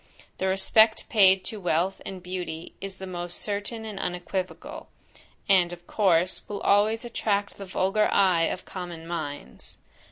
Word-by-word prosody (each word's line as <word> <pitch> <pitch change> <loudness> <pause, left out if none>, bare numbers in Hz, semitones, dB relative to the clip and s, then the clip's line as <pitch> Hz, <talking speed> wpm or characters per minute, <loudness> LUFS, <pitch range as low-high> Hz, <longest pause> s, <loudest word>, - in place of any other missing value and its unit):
The 190 - 0
respect 215 +4 +4
paid 190 -4 +5
to 215 - -3
wealth 180 +1 0
and 185 -2 -7
beauty 180 -3 -5
is 195 0 -6
the 190 - -7
most 175 -1 -3
certain 210 +2 -3
and 210 -3 -6
unequivocal; 180 +1 -4 0.6
and 185 -4 +4
of 175 0 -10
course, 185 -4 +2
will 205 -1 -5
always 215 +3 +3
attract 205 -4 -1
the 200 - -6
vulgar 195 +3 +1
eye 180 -4 +4
of 185 - -3
common 175 -3 -7
minds. 160 -4 -6
190 Hz, 150 wpm, -26 LUFS, 175-205 Hz, 0.6 s, paid